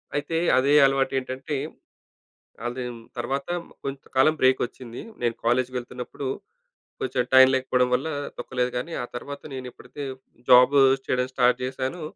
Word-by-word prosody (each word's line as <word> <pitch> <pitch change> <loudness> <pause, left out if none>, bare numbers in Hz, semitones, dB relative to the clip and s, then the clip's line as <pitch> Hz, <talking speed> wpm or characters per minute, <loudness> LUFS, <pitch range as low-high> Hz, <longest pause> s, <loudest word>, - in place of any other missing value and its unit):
అయితే 145 +3 -1 0.2
అదే 135 +3 +3
అలవాటేంటంటే 135 +1 -1 1.1
అది 125 +1 -4 0.3
తర్వాత 135 +4 -2 0.4
కొంత 135 0 -5 0.2
కాలం 155 +4 +5
బ్రేకొచ్చింది. 130 -2 0 0.2
నేను 120 -1 0
కాలేజ్‌కి 125 +2 +1
వెళ్తున్నప్పుడు 125 +2 -6 0.7
కొంచెం 125 -1 0
టైం 130 0 +10
లేకపోవడం 130 -1 +1
వల్ల 135 +6 0 0.3
తొక్కలేదు. 125 -1 -2
గానీ 150 +7 -5
ఆ - - -3
తరువాత 140 +4 -7
నేనెప్పుడైతే 130 +2 -8 0.5
జాబ్ 125 +2 +7 0.3
చేయడం 125 0 0
స్టార్ట్ 125 -1 +3
చేశాను, 130 +6 -4
130 Hz, 120 wpm, -25 LUFS, 125-135 Hz, 1.1 s, టైం